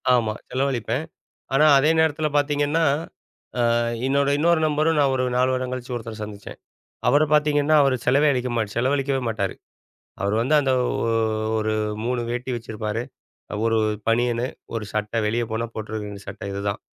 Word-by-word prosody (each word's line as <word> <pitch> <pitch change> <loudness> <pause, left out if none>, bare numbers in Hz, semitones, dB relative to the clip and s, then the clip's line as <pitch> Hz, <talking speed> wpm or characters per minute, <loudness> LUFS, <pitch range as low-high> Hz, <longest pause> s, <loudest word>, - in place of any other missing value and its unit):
ஆமா, 110 -3 +1 0.2
செலவழிப்பேன். 130 +1 -1 0.5
ஆனா 150 +3 +5
அதே 150 +4 +3
நேரத்தில 155 -1 +1
பாத்தீங்கன்னா, 145 +2 +1 1.2
என்னோட 140 +1 +2
இன்னொரு 170 +1 +3
நண்பரும் 155 +1 +1
நான் 140 -2 +3
ஒரு 130 0 +1
4 130 +1 +3
வருடம் 130 0 -2
கழிச்சு 130 0 -5
ஒருத்தர 115 -1 -7
சந்திச்சேன். 105 -1 -10 0.5
அவரை 145 +4 +5
பாத்திங்கன்னா 150 0 +3
அவர் 135 -2 +3
செலவே 140 +4 +4
அழிக்க 125 0 -1
மாட்ட 110 -3 0
செலவழிக்கவே 135 +1 +1
மாட்டாரு. 100 -4 -2 0.7
அவர் 100 +2 0
வந்து 135 +6 +1
அந்த 135 -2 +1
ஒ 115 - -1 0.5
ஒரு 110 0 0 0.3
3 125 0 0
வேட்டி 125 +2 -3
வச்சிருப்பார். 110 -1 -4 0.6
1 115 0 +2 0.3
பனியனு, 120 +1 +1 0.3
1 110 -2 -2
சட்டை 105 +2 -2
வெளிய 120 +2 0
போனா 115 +1 -1
போட்டுருக்க 110 -1 -5
வேண்டிய 100 -1 -9
சட்டை - - -7
இதுதான். 100 0 -3
125 Hz, 150 wpm, -23 LUFS, 110-145 Hz, 1.2 s, ஆனா